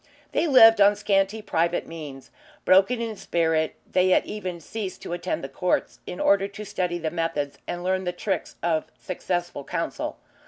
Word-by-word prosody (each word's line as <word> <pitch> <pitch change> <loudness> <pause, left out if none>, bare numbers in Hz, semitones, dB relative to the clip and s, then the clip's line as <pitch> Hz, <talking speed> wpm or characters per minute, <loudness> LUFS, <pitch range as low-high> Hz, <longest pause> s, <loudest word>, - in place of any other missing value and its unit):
They 340 - +1
lived 225 -6 +8
on 200 +1 +6
scanty 205 +1 +1
private 170 -2 0
means. 150 -5 -9 0.3
Broken 195 +6 +5
in 230 -2 -3
spirit 160 -4 0 0.2
they 185 0 +3
had 185 - +4
even 185 -5 -5
ceased 195 +3 -6
to - - -5
attend 175 +1 -3
the - - -3
courts 175 +7 -1
in 180 - -6
order 200 0 +3
to 205 +1 -9
study 180 -3 -2
the 160 -2 -3
methods 165 -4 -2
and 175 0 -4
learn 185 +1 0
the 180 - 0
tricks 180 0 -3
of 160 -2 +1
successful 175 -4 -3
counsel. - - -3
180 Hz, 170 wpm, -25 LUFS, 165-200 Hz, 0.3 s, lived